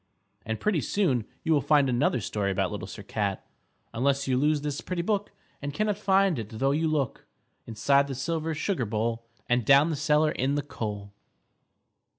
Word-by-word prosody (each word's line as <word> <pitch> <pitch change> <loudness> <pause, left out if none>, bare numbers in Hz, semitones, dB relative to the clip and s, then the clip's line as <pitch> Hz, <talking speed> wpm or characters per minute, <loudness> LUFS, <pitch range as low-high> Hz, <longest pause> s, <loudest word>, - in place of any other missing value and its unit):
_ - - -46 0.4
And 110 -1 -2
pretty 200 -8 +1
soon 130 - 0 0.2
you 160 - +2
will 145 - +3
find 145 -2 +4
another 125 0 +1
story 100 0 -2
about 95 +1 0
Little 100 -3 -5
Sir 100 - -9
Cat 100 -1 -2 0.5
_Unless 135 +3 +1
you 130 - +2
lose 150 +3 +2
this 145 -1 -3
pretty 180 -2 -3
book 205 +1 -1 0.3
And 145 0 -5
cannot 210 -1 +1
find 195 - +3
it 110 0 -7
tho' 135 +3 +2
you 160 +3 +1
look 145 -6 -2 0.4
Inside 140 +6 +2
the 135 - -4
silver 160 +4 -2
sugar 155 - -1
bowl 115 +2 -2 0.2
And 120 0 +2
down 140 +6 +5
the - - -1
cellar 150 +1 +2
in 135 +1 0
the 145 - -1
coal. 105 -7 -6
140 Hz, 185 wpm, -27 LUFS, 115-155 Hz, 0.5 s, down